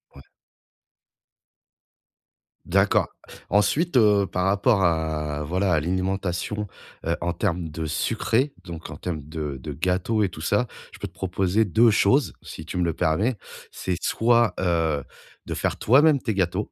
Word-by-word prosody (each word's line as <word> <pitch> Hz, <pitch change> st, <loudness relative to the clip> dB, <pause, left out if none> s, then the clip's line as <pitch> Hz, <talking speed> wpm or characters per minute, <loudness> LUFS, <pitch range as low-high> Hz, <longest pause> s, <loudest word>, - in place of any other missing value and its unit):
Ouais. -, -, -12 dB, 2.4 s
D'accord. -, -, +3 dB, 0.4 s
Ensuite, 130 Hz, -, +2 dB
heu, 105 Hz, -4 st, +4 dB
par 90 Hz, 0 st, -1 dB
rapport 100 Hz, +2 st, +3 dB
à 80 Hz, -3 st, 0 dB
voilà, 90 Hz, +4 st, 0 dB
à 80 Hz, -, +3 dB
l'alimentation, 95 Hz, +4 st, -2 dB, 0.4 s
heu, 85 Hz, +1 st, 0 dB
en 85 Hz, 0 st, -1 dB
termes 90 Hz, -3 st, -2 dB
de 80 Hz, +1 st, -5 dB
sucré, 115 Hz, -, 0 dB
donc 85 Hz, -2 st, -8 dB
en 75 Hz, -, -8 dB
termes 75 Hz, -5 st, -5 dB
de 75 Hz, -3 st, -4 dB
de 70 Hz, +3 st, -7 dB
gâteau 95 Hz, +8 st, 0 dB
et 100 Hz, -, +1 dB
tout 85 Hz, -3 st, -10 dB
ça. 100 Hz, +9 st, +1 dB, 0.3 s
Je -, -, -13 dB
peux -, -, -4 dB
te -, -, -19 dB
proposer 95 Hz, +3 st, 0 dB
2 110 Hz, +5 st, +4 dB
choses, 115 Hz, +6 st, +3 dB
si 80 Hz, -, -9 dB
tu 85 Hz, -, -5 dB
me 90 Hz, -, +1 dB
le 85 Hz, -1 st, 0 dB
permets. 100 Hz, +12 st, +1 dB, 0.4 s
C'est 90 Hz, -, -3 dB
soit, 120 Hz, 0 st, +3 dB
heu, 80 Hz, -5 st, +1 dB, 0.4 s
de -, -, -3 dB
faire -, -, -1 dB
toi-même 140 Hz, +5 st, +5 dB
tes 110 Hz, -4 st, -2 dB
gâteaux. 95 Hz, +2 st, -1 dB
95 Hz, 155 wpm, -24 LUFS, 80-105 Hz, 2.4 s, toi-même